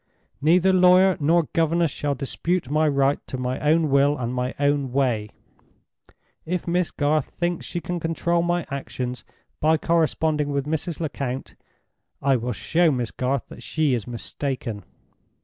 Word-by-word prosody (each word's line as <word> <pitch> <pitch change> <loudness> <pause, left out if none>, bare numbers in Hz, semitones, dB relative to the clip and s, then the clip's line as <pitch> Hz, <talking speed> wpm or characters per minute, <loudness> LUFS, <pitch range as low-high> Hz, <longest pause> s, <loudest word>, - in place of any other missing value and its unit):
"Neither 180 +5 +4
lawyer 185 0 +6
nor 165 +3 +3
governess 165 -1 +2
shall 145 +1 -2
dispute 145 +3 -2
my 155 +1 +3
right 140 -1 +2
to 130 - -4
my 125 0 -2
own 155 0 +2
will 140 +1 +4
and 120 -1 -3
my 125 0 -2
own 145 -2 +1
way. 120 -6 0 1.1
If 180 +2 -3
Miss 175 0 +1
Garth 150 0 0
thinks 175 0 -3
she 175 - -4
can 175 +1 -3
control 170 +1 0
my 175 -1 0
actions 125 -3 -4 0.4
by 160 +1 +3
corresponding 155 -2 +1
with 140 -1 -1
Mrs. 160 +2 -3
Lecount, 135 -4 -4 0.7
I 135 -1 +2
will 125 0 -2
show 165 - +2
Miss 125 -5 -1
Garth 130 +1 -1 0.2
she 155 -4 0
is 115 -5 -2
mistaken! 120 - -4
145 Hz, 150 wpm, -24 LUFS, 130-170 Hz, 1.1 s, lawyer